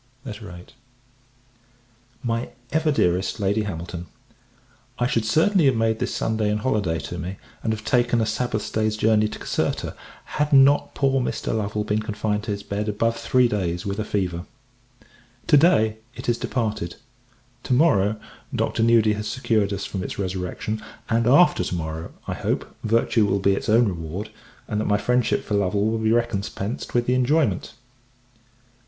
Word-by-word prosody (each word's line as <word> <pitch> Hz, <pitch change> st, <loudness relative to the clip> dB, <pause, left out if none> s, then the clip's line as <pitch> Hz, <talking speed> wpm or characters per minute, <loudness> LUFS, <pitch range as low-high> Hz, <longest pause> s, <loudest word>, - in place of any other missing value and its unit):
VIII. 105 Hz, -7 st, -8 dB, 1.6 s
MY 115 Hz, 0 st, -1 dB, 0.2 s
EVER 160 Hz, 0 st, +2 dB
DEAREST 95 Hz, -6 st, +1 dB
LADY 100 Hz, +2 st, +1 dB
HAMILTON, 85 Hz, -2 st, -6 dB, 0.9 s
I 120 Hz, -, +1 dB
should 115 Hz, -3 st, 0 dB
certainly 165 Hz, -, +3 dB
have 135 Hz, -2 st, +4 dB
made 115 Hz, -1 st, +1 dB
this -, -, -1 dB
Sunday 110 Hz, -1 st, 0 dB
an 105 Hz, -, +1 dB
holy 110 Hz, -1 st, 0 dB
day 80 Hz, -4 st, -1 dB
to -, -, -6 dB
me, 90 Hz, +4 st, -4 dB, 0.3 s
and 110 Hz, -, -1 dB
have 110 Hz, -1 st, -4 dB
taken 120 Hz, -1 st, +2 dB
a 110 Hz, -, +2 dB
Sabbath 110 Hz, 0 st, -2 dB
day's 110 Hz, 0 st, 0 dB
journey 110 Hz, 0 st, +3 dB
to -, -, -7 dB
Caserta, -, -, -2 dB, 0.3 s
had 150 Hz, 0 st, -1 dB
not 140 Hz, +1 st, +5 dB
poor 135 Hz, -1 st, +2 dB
Mr. 120 Hz, -, -2 dB
Lovel 105 Hz, -1 st, -1 dB
been 105 Hz, 0 st, 0 dB
confined 105 Hz, -1 st, -2 dB
to 110 Hz, -, -2 dB
his 100 Hz, 0 st, -4 dB
bed 105 Hz, +2 st, -3 dB
above 115 Hz, +2 st, 0 dB
three 125 Hz, +2 st, +3 dB
days 90 Hz, -6 st, -2 dB
with 100 Hz, +1 st, -3 dB
a -, -, 0 dB
fever. 90 Hz, -4 st, -2 dB, 1.0 s
To 150 Hz, -, +5 dB
day, 110 Hz, -9 st, +4 dB, 0.2 s
it -, -, -8 dB
is 120 Hz, -1 st, +1 dB
departed; 110 Hz, -8 st, -2 dB, 0.7 s
to 125 Hz, -, -1 dB
morrow, 110 Hz, -8 st, +3 dB, 0.4 s
Dr. -, -, 0 dB
Nudi 115 Hz, -2 st, +4 dB
has 105 Hz, 0 st, -4 dB
secured 110 Hz, -4 st, 0 dB
us 100 Hz, -1 st, -3 dB
from 95 Hz, -, -4 dB
its -, -, -5 dB
resurrection; 95 Hz, +3 st, -3 dB, 0.3 s
and, 115 Hz, 0 st, +2 dB
after 140 Hz, -, +5 dB
to 90 Hz, -, -3 dB
morrow, 80 Hz, 0 st, -5 dB, 0.2 s
I -, -, -2 dB
hope, -, -, -3 dB
virtue 115 Hz, -1 st, +2 dB
will 100 Hz, -, +1 dB
be 100 Hz, 0 st, +3 dB
its 95 Hz, -, -3 dB
own 115 Hz, +2 st, +5 dB
reward, 90 Hz, +3 st, -5 dB, 0.4 s
and 105 Hz, 0 st, -1 dB
that -, -, -2 dB
my 105 Hz, -, +4 dB
friendship 125 Hz, +2 st, +1 dB
for -, -, -4 dB
Lovel 100 Hz, 0 st, +1 dB
will 110 Hz, +1 st, 0 dB
be 110 Hz, 0 st, +1 dB
recompensed 115 Hz, -2 st, -2 dB
with 120 Hz, 0 st, +3 dB
the 125 Hz, -, +2 dB
enjoyment. 140 Hz, +5 st, +1 dB
110 Hz, 170 wpm, -23 LUFS, 100-120 Hz, 1.6 s, not